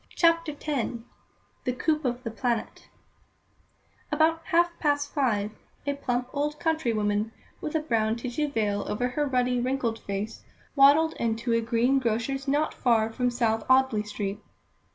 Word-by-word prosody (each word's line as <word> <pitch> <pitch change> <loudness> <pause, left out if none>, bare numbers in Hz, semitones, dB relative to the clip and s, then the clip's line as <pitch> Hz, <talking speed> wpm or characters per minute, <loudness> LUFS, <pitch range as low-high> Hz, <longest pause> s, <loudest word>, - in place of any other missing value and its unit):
CHAPTER 335 -2 +3
X 285 -5 -1 0.7
The 250 - 0
Coup 305 +4 0
of 250 -1 -2
"The 230 - -4
Planet" 235 -1 -3 1.2
About 320 +2 +3
half 345 0 +3
past 290 -1 0
five, 215 -7 +1 0.3
a 285 - 0
plump 250 -3 -2
old 295 +1 -1
country 320 -6 +1
woman, 210 0 0 0.3
with 305 - -4
a 315 - +2
brown 225 -7 +1
tissue 250 +5 -2
veil 205 -5 0
over 245 +4 -1
her 295 +3 -1
ruddy, 250 -1 +1
wrinkled 245 -3 -1
face, 200 +2 -5 0.3
waddled 290 +3 +6
into 230 +1 0
a 230 - +3
green 235 +4 +2
grocer's 255 +3 -1
not 295 +3 +1
far 225 -3 +2
from 250 +1 +1
South 225 -3 0
Audley 260 -4 +4
Street. 210 -1 -4
250 Hz, 150 wpm, -27 LUFS, 225-290 Hz, 1.2 s, waddled